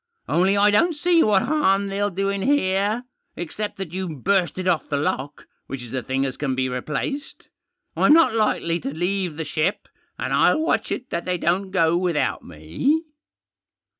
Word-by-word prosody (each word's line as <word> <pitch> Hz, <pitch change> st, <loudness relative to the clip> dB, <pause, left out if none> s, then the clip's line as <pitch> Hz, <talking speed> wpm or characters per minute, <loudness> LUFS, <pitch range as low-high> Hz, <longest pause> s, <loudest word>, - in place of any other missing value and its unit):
Only 190 Hz, +4 st, +2 dB
I 205 Hz, +1 st, +5 dB
don't 330 Hz, +11 st, +3 dB
see 340 Hz, +2 st, +3 dB
what 205 Hz, -7 st, +3 dB
harm 200 Hz, -10 st, +2 dB
they'll 200 Hz, +1 st, -1 dB
do 195 Hz, +1 st, -1 dB
in 200 Hz, 0 st, -2 dB
here, 210 Hz, -3 st, +1 dB, 0.3 s
except 205 Hz, +5 st, -5 dB
that 190 Hz, -4 st, -6 dB
you've 175 Hz, -8 st, -5 dB
bursted 185 Hz, -1 st, +1 dB
off 175 Hz, -3 st, +1 dB
the 145 Hz, -, 0 dB
lock, 140 Hz, -1 st, -3 dB, 0.2 s
which 135 Hz, -2 st, -6 dB
is 120 Hz, 0 st, -10 dB
a 130 Hz, -, -1 dB
thihg 130 Hz, +3 st, -1 dB
las 135 Hz, -2 st, -3 dB
can 135 Hz, -3 st, -1 dB
be 130 Hz, 0 st, 0 dB
replaced. 150 Hz, -, -4 dB, 0.5 s
I'm 290 Hz, -, +5 dB
not 325 Hz, -6 st, +5 dB
likely 175 Hz, -6 st, +1 dB
to 140 Hz, -, -4 dB
leave 175 Hz, +1 st, -2 dB
the 160 Hz, -, -3 dB
ship* 155 Hz, +6 st, -1 dB, 0.3 s
and -, -, -3 dB
I'll -, -, +4 dB
watch 320 Hz, -, 0 dB
it 255 Hz, -, -4 dB
that 170 Hz, -, -3 dB
they 180 Hz, 0 st, -1 dB
don't 180 Hz, +3 st, 0 dB
go 170 Hz, -3 st, +2 dB
without 175 Hz, -4 st, 0 dB
me." 85 Hz, -, -1 dB
185 Hz, 180 wpm, -23 LUFS, 155-205 Hz, 0.5 s, I